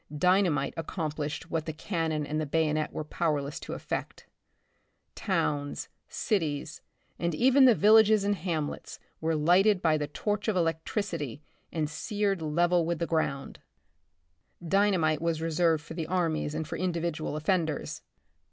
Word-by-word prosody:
Dynamite 180 Hz, -5 st, +2 dB
accomplished 155 Hz, -2 st, -4 dB
what 165 Hz, -1 st, -2 dB
the 160 Hz, -, -3 dB
can 165 Hz, +1 st, -2 dB
non 155 Hz, -1 st, -1 dB
and 155 Hz, +2 st, -2 dB
the 155 Hz, -, -3 dB
bayonet 155 Hz, 0 st, 0 dB
were -, -, -4 dB
powerless 150 Hz, -3 st, -2 dB
to -, -, -7 dB
effect. -, -, -5 dB, 0.9 s
Towns, 145 Hz, -1 st, -2 dB, 0.2 s
cities 160 Hz, -6 st, -2 dB, 0.4 s
and 170 Hz, -2 st, -1 dB
even 265 Hz, -, +5 dB
the 245 Hz, -3 st, +7 dB
villages 215 Hz, 0 st, +6 dB
and 205 Hz, 0 st, +2 dB
ham 165 Hz, -4 st, -2 dB
lets, -, -, -8 dB, 0.2 s
were 160 Hz, 0 st, 0 dB
lighted 180 Hz, +6 st, +4 dB
by 160 Hz, -3 st, +2 dB
the 150 Hz, -, -2 dB
torch 205 Hz, +8 st, -2 dB
of 215 Hz, -, +1 dB
electricity 165 Hz, -, -2 dB, 0.3 s
and 155 Hz, -2 st, -1 dB
seared 200 Hz, +3 st, -1 dB
level 170 Hz, +3 st, +2 dB
with 170 Hz, +1 st, -1 dB
the 170 Hz, -, -1 dB
ground. 150 Hz, -5 st, -2 dB, 1.1 s
Dynamite 175 Hz, -5 st, +2 dB
was 165 Hz, -1 st, 0 dB
reserved 165 Hz, -1 st, +1 dB
for 160 Hz, -, -9 dB
the 160 Hz, -2 st, -4 dB
armies 165 Hz, -4 st, -1 dB
and 155 Hz, -1 st, -3 dB
for -, -, -4 dB
individual 170 Hz, -4 st, -2 dB
offenders. 160 Hz, -1 st, -1 dB
165 Hz, 145 wpm, -29 LUFS, 155-185 Hz, 1.1 s, the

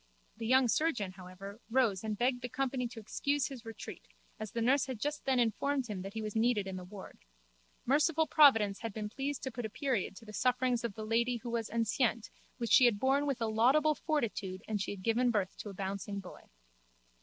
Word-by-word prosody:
The 225 Hz, -1 st, -4 dB
young 260 Hz, +1 st, +5 dB
surgeon, 240 Hz, -, +1 dB
however, 190 Hz, +2 st, -10 dB
rose 225 Hz, -6 st, +2 dB
and 215 Hz, -1 st, -2 dB
begged 245 Hz, +1 st, +1 dB
the 245 Hz, -, -4 dB
company 255 Hz, -1 st, -1 dB
to 235 Hz, -1 st, -9 dB
excuse 280 Hz, +6 st, -1 dB
his 260 Hz, -4 st, -9 dB
retreat 225 Hz, -1 st, -9 dB, 0.3 s
as 215 Hz, -1 st, -5 dB
the 235 Hz, -, -3 dB
nurse 260 Hz, +4 st, +3 dB
had 255 Hz, -4 st, -5 dB
just 295 Hz, +4 st, -3 dB
then 265 Hz, -1 st, +2 dB
informed 265 Hz, +4 st, +1 dB
him 205 Hz, -5 st, -5 dB
that 195 Hz, +3 st, -8 dB
he 220 Hz, -, -3 dB
was 215 Hz, 0 st, -5 dB
needed 225 Hz, -2 st, +2 dB
in 190 Hz, -1 st, -5 dB
the 185 Hz, -, -6 dB
ward. 190 Hz, +2 st, -11 dB, 0.7 s
Merciful 305 Hz, +4 st, +3 dB
providence 225 Hz, -11 st, +5 dB
had 230 Hz, -2 st, -5 dB
been 210 Hz, 0 st, -4 dB
pleased 275 Hz, +4 st, -4 dB
to 265 Hz, -, -3 dB
put 245 Hz, +1 st, -5 dB
a 220 Hz, -, -3 dB
period 235 Hz, -5 st, -1 dB
to 225 Hz, -, -12 dB
the 215 Hz, -, -10 dB
sufferings 250 Hz, 0 st, +1 dB
of 230 Hz, -4 st, -3 dB
the 215 Hz, -, -5 dB
lady 235 Hz, +3 st, +1 dB
who 235 Hz, 0 st, -6 dB
was 230 Hz, -2 st, -2 dB
enceinte 230 Hz, 0 st, 0 dB, 0.3 s
which 235 Hz, -1 st, -3 dB
she 255 Hz, -, +8 dB
had 235 Hz, -4 st, +4 dB
borne 275 Hz, +4 st, +2 dB
with 270 Hz, -4 st, -1 dB
a -, -, +1 dB
laudable 260 Hz, +8 st, +4 dB
fortitude 225 Hz, -, -2 dB
and 210 Hz, -2 st, -1 dB
she -, -, -2 dB
had 195 Hz, -2 st, -6 dB
given 240 Hz, +3 st, +2 dB
birth 200 Hz, -5 st, 0 dB
to 210 Hz, -, -7 dB
a -, -, -8 dB
bouncing 200 Hz, +1 st, -4 dB
boy. 185 Hz, -2 st, -11 dB
230 Hz, 220 wpm, -32 LUFS, 210-260 Hz, 0.7 s, she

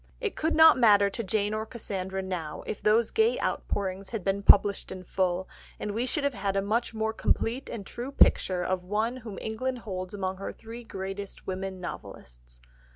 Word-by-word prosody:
It 435 Hz, -6 st, -2 dB
could 320 Hz, +1 st, 0 dB
not 320 Hz, -3 st, +8 dB
matter 205 Hz, -4 st, +6 dB
to 230 Hz, -, -3 dB
Jane 205 Hz, +1 st, 0 dB
or 215 Hz, 0 st, -1 dB
Cassandra 190 Hz, -4 st, -4 dB
now 175 Hz, -5 st, -4 dB
if 205 Hz, -, -5 dB
those 220 Hz, +2 st, +3 dB
gay 450 Hz, +2 st, +3 dB
outpourings 190 Hz, -1 st, -2 dB
had 225 Hz, -5 st, -4 dB
been 195 Hz, +1 st, 0 dB
published 200 Hz, 0 st, +5 dB
in 185 Hz, -1 st, -7 dB
full, 185 Hz, 0 st, 0 dB, 0.3 s
and 210 Hz, -, -3 dB
we 230 Hz, +5 st, -1 dB
should 295 Hz, +2 st, -1 dB
have 280 Hz, -1 st, +1 dB
had 195 Hz, -2 st, -2 dB
a 195 Hz, -, +2 dB
much 225 Hz, +4 st, 0 dB
more 220 Hz, 0 st, 0 dB
complete 240 Hz, +4 st, 0 dB
and 215 Hz, -5 st, -6 dB
true 245 Hz, +7 st, -6 dB
picture 185 Hz, -9 st, +4 dB
of 185 Hz, 0 st, -1 dB
one 215 Hz, +6 st, -1 dB
whom 220 Hz, -5 st, -8 dB
England 250 Hz, +4 st, -3 dB
holds 185 Hz, -1 st, -4 dB
among 190 Hz, -1 st, -2 dB
her 195 Hz, -, -5 dB
three 230 Hz, +2 st, -10 dB
greatest 195 Hz, -1 st, -6 dB
women 190 Hz, 0 st, -4 dB
novelists. -, -, -9 dB
200 Hz, 190 wpm, -28 LUFS, 190-230 Hz, 0.3 s, not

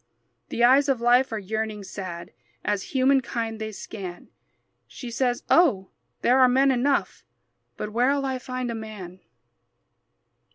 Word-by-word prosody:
The 240 Hz, -, -1 dB
eyes 270 Hz, +4 st, +5 dB
of 265 Hz, -3 st, +1 dB
life 245 Hz, +2 st, +3 dB
are 220 Hz, -, -2 dB
yearning, 215 Hz, +1 st, -4 dB
sad, 180 Hz, -2 st, -7 dB, 0.3 s
As 205 Hz, -1 st, 0 dB, 0.2 s
humankind 240 Hz, -4 st, +1 dB
they 220 Hz, 0 st, -4 dB
scan. 190 Hz, -3 st, -8 dB, 0.6 s
She 245 Hz, -3 st, -9 dB
says, 245 Hz, 0 st, -1 dB
"Oh, 240 Hz, -, +3 dB, 0.3 s
there 255 Hz, +2 st, +4 dB
are 255 Hz, -1 st, +6 dB
men 270 Hz, +2 st, +4 dB
enough, 265 Hz, +3 st, 0 dB, 0.5 s
But 210 Hz, -, -5 dB
where'll 275 Hz, +4 st, +2 dB
I 260 Hz, -1 st, -2 dB
find 255 Hz, -1 st, -4 dB
a -, -, -3 dB
man?" 205 Hz, -5 st, -8 dB
235 Hz, 135 wpm, -25 LUFS, 210-260 Hz, 0.6 s, are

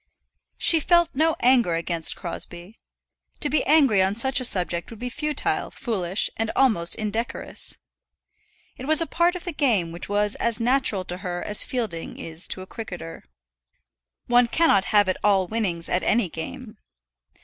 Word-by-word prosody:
She 330 Hz, -, +6 dB
felt 345 Hz, +1 st, +2 dB
no 315 Hz, +3 st, +1 dB
anger 240 Hz, -9 st, +3 dB
against 165 Hz, -1 st, -1 dB
Crosbie. 175 Hz, +3 st, -8 dB, 0.6 s
To 295 Hz, -, -1 dB
be 305 Hz, -, +2 dB
angry 275 Hz, -10 st, +4 dB
on 190 Hz, +2 st, +1 dB
such 265 Hz, +4 st, +2 dB
a 255 Hz, -, -1 dB
subject 175 Hz, -6 st, +3 dB
would 230 Hz, -, -11 dB
be 245 Hz, +3 st, -6 dB
futile, 300 Hz, +4 st, -2 dB
foolish, 195 Hz, -6 st, -1 dB
and 225 Hz, 0 st, -1 dB
almost 215 Hz, -11 st, +2 dB
indecorous. 220 Hz, +2 st, -2 dB, 1.0 s
It 260 Hz, -, -8 dB
was 315 Hz, 0 st, +7 dB
a 330 Hz, -, +3 dB
part 345 Hz, +2 st, 0 dB
of 360 Hz, -, -7 dB
the 350 Hz, -, -5 dB
game 220 Hz, -, +1 dB
which 170 Hz, +3 st, -8 dB
was 205 Hz, 0 st, +1 dB
as 235 Hz, 0 st, 0 dB
natural 230 Hz, -6 st, +1 dB
to 180 Hz, -, -5 dB
her 175 Hz, -1 st, -5 dB
as 210 Hz, -, +3 dB
fielding 220 Hz, -10 st, -5 dB
is 165 Hz, +2 st, -5 dB
to 185 Hz, -, -1 dB
a -, -, -9 dB
cricketer. 175 Hz, -, -9 dB, 1.0 s
One 245 Hz, 0 st, +3 dB
cannot 230 Hz, -, +2 dB
have 205 Hz, -2 st, +2 dB
it 185 Hz, -, -1 dB
all 195 Hz, -2 st, +3 dB
winnings 180 Hz, -5 st, -3 dB
at 180 Hz, -, 0 dB
any 215 Hz, -4 st, +1 dB
game. 215 Hz, +7 st, -9 dB
220 Hz, 165 wpm, -23 LUFS, 180-260 Hz, 1.0 s, was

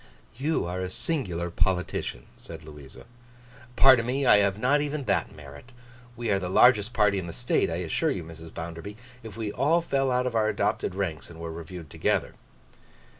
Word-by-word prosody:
'You 145 Hz, -, -1 dB
are 90 Hz, +2 st, -4 dB
a 95 Hz, 0 st, -3 dB
singular 90 Hz, -, -3 dB
politician,' 90 Hz, -9 st, -1 dB
said 80 Hz, -1 st, -11 dB
Louisa. 75 Hz, -3 st, -12 dB, 0.7 s
'Pardon 130 Hz, -3 st, +7 dB
me; 135 Hz, +2 st, 0 dB
I 105 Hz, -, +7 dB
have 100 Hz, -1 st, +2 dB
not 130 Hz, +6 st, +2 dB
even 145 Hz, 0 st, -3 dB
that -, -, 0 dB
merit. 70 Hz, -, -12 dB, 0.5 s
We 120 Hz, -2 st, -2 dB
are 100 Hz, -, +2 dB
the 90 Hz, -2 st, -4 dB
largest 110 Hz, +2 st, +5 dB
party 105 Hz, -4 st, +2 dB
in 90 Hz, -, -6 dB
the 85 Hz, -, -7 dB
state, 120 Hz, -1 st, 0 dB
I 80 Hz, -, -2 dB
assure 80 Hz, -, 0 dB
you, 90 Hz, -, -2 dB
Mrs. 80 Hz, 0 st, -11 dB
Bounderby, 85 Hz, +5 st, -7 dB, 0.2 s
if 110 Hz, -2 st, -10 dB
we 110 Hz, -2 st, -3 dB
all 155 Hz, +9 st, +2 dB
fell 135 Hz, -5 st, 0 dB
out 125 Hz, 0 st, +1 dB
of 125 Hz, -, -2 dB
our 110 Hz, -1 st, +2 dB
adopted 90 Hz, -, -1 dB
ranks 90 Hz, -6 st, -3 dB
and 85 Hz, -1 st, -12 dB
were 85 Hz, 0 st, -5 dB
reviewed 85 Hz, -1 st, -9 dB
together. -, -, 0 dB
100 Hz, 185 wpm, -27 LUFS, 85-125 Hz, 0.7 s, Pardon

